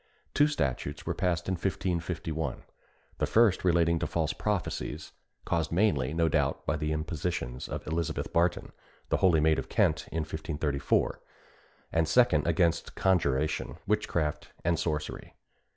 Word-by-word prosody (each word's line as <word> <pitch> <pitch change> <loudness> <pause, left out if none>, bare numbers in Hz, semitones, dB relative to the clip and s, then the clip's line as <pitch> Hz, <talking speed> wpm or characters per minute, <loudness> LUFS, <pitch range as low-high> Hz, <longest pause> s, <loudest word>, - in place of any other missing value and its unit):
Two 145 - +5
statutes 70 - -2
were - - -1
passed 90 -2 -1
in 95 - +1
1551: 85 -3 -2 0.6
the - - +1
first 110 -4 +4
relating 85 -2 +3
to - - -1
false - - -1
prophecies, 105 -4 -3 0.3
caused 80 -1 0
mainly, 80 -8 +2
no 80 +1 +2
doubt, 80 - 0
by 70 - +1
the 75 0 -2
impositions 75 -5 -3
of - - -5
Elizabeth 80 0 -2
Barton, 85 +1 +1 0.4
the - - +2
holy 90 -5 +4
maid 80 0 +3
of - - -6
Kent, - - +2
in 80 - -1
1534; 75 -2 -1 0.7
and 80 -1 +2
the - - -2
second 125 0 +4
against 85 -3 +1
conjuration, 80 -5 +1
witchcraft, 75 -3 -1 0.2
and 85 0 +2
sorcery. 75 -2 -3
80 Hz, 140 wpm, -29 LUFS, 75-90 Hz, 0.7 s, Two